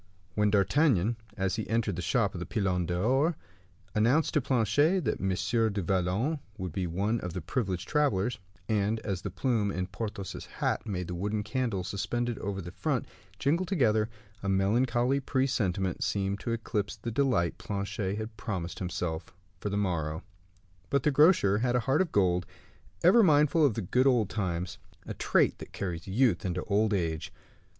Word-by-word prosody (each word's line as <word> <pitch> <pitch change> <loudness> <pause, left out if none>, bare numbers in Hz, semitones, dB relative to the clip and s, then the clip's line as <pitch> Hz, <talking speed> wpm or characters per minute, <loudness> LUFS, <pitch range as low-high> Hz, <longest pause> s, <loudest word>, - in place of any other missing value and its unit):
When 105 +1 +2
D'Artagnan, 110 - +3 0.2
as 95 +1 0
he 110 - -4
entered 110 -4 +1
the 90 - -3
shop - - +1
of - - -5
the - - -4
Pilon 90 -4 0
d'Or, 130 - +1 0.6
announced 125 +9 +3
to 150 - +3
Planchet 135 - +2
that 110 - -1
M. 95 - 0 0.4
du 100 0 -2
Vallon 95 - 0 0.2
would 95 -4 -4
be 90 +2 -2
one 100 +7 0
of 90 -3 -5
the 90 - -4
privileged 95 - -2
travelers, 125 -8 +1 0.3
and 105 +1 +1
as 95 -3 -3
the - - -4
plume 115 -6 0
in 90 -2 -2
Porthos's 100 0 -6
hat - - -2
made 90 -4 -3
the 90 - -4
wooden 105 +4 -2
candles 110 -5 -2
suspended 120 +3 -2
over 100 -1 -3
the 85 - -7
front 140 - -1 0.3
jingle 155 - +1
together, 115 - +2 0.3
a 100 - -2
melancholy 120 +7 +2
presentiment 105 -10 0
seemed 100 0 -1
to 115 - -3
eclipse 110 -3 -2
the 115 - -5
delight 115 -9 +1
Planchet 100 0 -3
had 110 +1 -5
promised 95 -7 -4
himself 90 -2 -3 0.3
for 105 - -3
the 100 - -1
morrow. 80 -6 -1 0.7
But 140 -2 +1
the 150 - +3
grocer 140 - +5
had 125 +1 +1
a 125 - +3
heart 135 +9 +2
of 185 - -1
gold, 90 -2 +2 0.6
ever 190 +7 +7
mindful 150 -3 +4
of 135 -8 +3
the 110 - -2
good 125 +9 +2
old 115 -7 +3
times 90 -2 -2 0.3
a - - -5
trait - - +2
that - - -10
carries 85 -3 -4
youth 105 -1 +2
into 90 -1 -2
old 105 +1 +1
age. 85 -5 -1
105 Hz, 175 wpm, -29 LUFS, 95-125 Hz, 0.7 s, ever